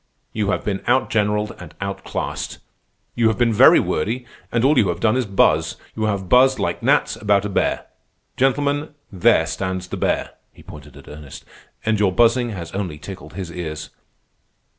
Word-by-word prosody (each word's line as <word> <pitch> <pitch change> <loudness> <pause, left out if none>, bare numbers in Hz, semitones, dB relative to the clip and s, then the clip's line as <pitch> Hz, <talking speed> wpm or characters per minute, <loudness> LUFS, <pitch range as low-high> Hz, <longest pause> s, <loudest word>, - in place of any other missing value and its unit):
You 105 -2 -1
have 100 - -1
been 100 -2 -1
outgeneralled 105 -5 +1
and 80 -3 -11
outclassed. 100 0 -4 0.6
You 115 -2 +2
have 110 - +1
been 120 -2 +2
very - - +7
wordy, 115 +10 -2 0.3
and 115 0 +1
all 145 +3 +4
you 100 - +3
have 85 0 -2
done 110 +3 +2
is 130 -3 0
buzz. 100 -1 +2 0.2
You 110 - -1
have 100 -3 -2
buzzed 130 +4 +5
like - - -2
gnats - - +2
about 100 -1 +1
a - - -2
bear. 100 - 0 0.5
Gentlemen, 145 +3 0 0.2
there 95 -4 +3
stands 95 -1 -4
the - - -4
bear" - - -1 0.2
(he - - -17
pointed 75 -2 -12
at 70 - -15
Ernest), 75 -2 -11 0.4
"and 110 -1 +1
your 100 -3 +3
buzzing 120 +4 +3
has 90 -7 -7
only 95 -6 -4
tickled 80 -1 -10
his 90 -1 -6
ears. 80 -3 -6
100 Hz, 175 wpm, -21 LUFS, 90-115 Hz, 0.6 s, very